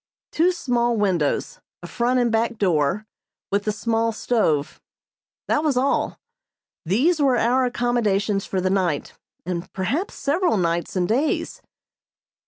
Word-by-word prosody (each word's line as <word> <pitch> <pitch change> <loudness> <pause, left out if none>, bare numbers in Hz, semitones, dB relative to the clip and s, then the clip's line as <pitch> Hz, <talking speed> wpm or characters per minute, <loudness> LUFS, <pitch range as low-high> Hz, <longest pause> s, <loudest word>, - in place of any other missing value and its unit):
Two 345 +3 +3
small 240 -8 0
windows, 180 -8 0 0.2
a - - -6
front 245 +6 +1
and 240 -2 +2
back 230 +1 0
door, 180 0 +1 0.5
with 200 0 0
the 215 - +1
small 225 +1 0
stove 210 -11 0 0.7
that 300 - +1
was 290 -5 +1
all. 265 +2 0 0.7
These 280 - +2
were 265 -3 +3
our 250 +3 +2
accommodations 215 -5 0
for 190 - -1
the 185 0 0
night, 180 -6 -1 0.3
and 175 0 -4
perhaps 265 - -2
several 325 - +1
nights 170 0 -1
and 180 -1 +1
days. 290 - -1
225 Hz, 135 wpm, -23 LUFS, 190-250 Hz, 0.7 s, Two